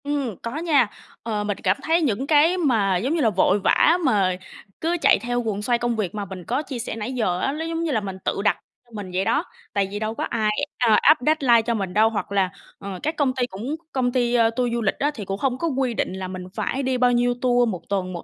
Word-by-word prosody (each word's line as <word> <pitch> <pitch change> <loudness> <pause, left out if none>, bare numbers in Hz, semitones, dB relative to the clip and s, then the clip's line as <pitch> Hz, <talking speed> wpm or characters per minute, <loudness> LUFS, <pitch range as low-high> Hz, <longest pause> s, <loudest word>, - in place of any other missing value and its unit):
Ừm, 280 -7 -2
có 235 +5 -5
nha, 310 -7 +3 0.4
ờ, 215 -2 -2
mình 205 -1 -2
cảm 190 +1 +2
thấy 330 +2 +2
những 265 -2 0
cái 315 +4 +4
mà, 220 - +2
giống 265 - -1
như 330 - 0
là, 230 - +4
vội 200 +1 +2
vã 320 - +4
mà 195 -7 +2 0.5
cứ 335 +2 0
chạy - - +5
theo 245 +3 -1
guồng 215 -3 -3
xoay 240 +3 +1
công 240 -1 0
việc 210 -3 -3
mà 205 -1 -3
mình 185 -1 -8
có 250 - -1
chia 270 -5 -6
sẻ 230 - -4
nãy 225 +3 -4
giờ 200 -8 0
á, 270 - 0
nó 320 +2 -4
giống 330 0 -2
như 330 - -1
là 225 -5 +1
mình 195 -2 -6
tự - - -1
đặt - - +3 0.3
cho 240 - -27
mình 200 -3 -6
vậy 190 +1 0
đó. 305 +5 +1 0.3
Tại 200 -2 +1
vì 205 - -4
đâu 215 +1 -2
có - - -3
ai, 220 -2 0 0.3
à, 225 -3 +4
áp 305 +1 +6
deadline 270 -7 +4
cho 235 +1 -1
mình 195 -5 -3
đâu. 215 +2 +4
Hoặc 215 -2 -4
là, 195 -2 +2 0.3
ờ, 195 -2 -6
các 310 +2 -1
công 280 -4 +1
ty 255 -2 +1
cũng 240 +8 -5 0.2
công 250 -2 0
ty 245 -1 +1 0.2
tour 245 -1 0
du 235 - -1
lịch 210 - +1
á, 290 +1 +1
thì 215 -7 -7
cũng 195 +1 -3
không 255 +2 -1
có 335 - -1
quy 265 -4 0
định 200 - -2
là 190 0 -5
mình 185 0 -6
phải 275 +2 -2
đi 260 -1 0
bao 250 0 +3
nhiêu 245 0 +2
tour 245 -2 +3
một 180 -5 -4
tuần, 185 -2 -1
một 170 - -6
235 Hz, 270 wpm, -23 LUFS, 200-270 Hz, 0.5 s, áp